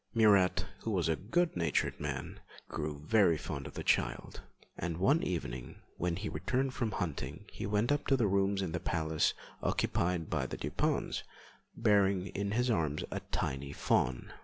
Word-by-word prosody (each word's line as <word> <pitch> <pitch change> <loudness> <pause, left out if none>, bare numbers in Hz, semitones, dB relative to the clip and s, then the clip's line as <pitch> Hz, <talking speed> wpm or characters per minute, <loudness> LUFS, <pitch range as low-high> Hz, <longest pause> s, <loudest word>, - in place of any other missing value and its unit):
Murat, 100 -5 +5
who - - -4
was 90 -6 +1
a 80 - +2
good 165 - 0
natured 85 -4 0
man, 70 -2 -4 0.3
grew 75 -1 -4
very 100 -5 +4
fond 70 -2 -5
of 70 - -11
the - - -4
child, - - 0 0.3
and 85 -1 -3
one 140 - +4
evening 65 -8 -3 0.2
when 85 -1 -1
he 105 +3 -4
returned 130 - -1
from 115 -5 -1
hunting 80 -6 -3
he - - -4
went 105 +4 +1
up 145 0 0
to 135 - +4
the 120 - +2
rooms 100 0 +2
in 90 - -2
the 85 - -1
palace 80 -3 +1 0.3
occupied 85 -2 0
by 70 -4 -1
the - - -5
Dupins - - -1 0.6
bearing 100 -4 +3
in 100 +1 -2
his 125 +2 +2
arms 80 -7 0
a - - -2
tiny 70 +1 -2
fawn. 60 -3 0
90 Hz, 170 wpm, -33 LUFS, 80-105 Hz, 0.6 s, Murat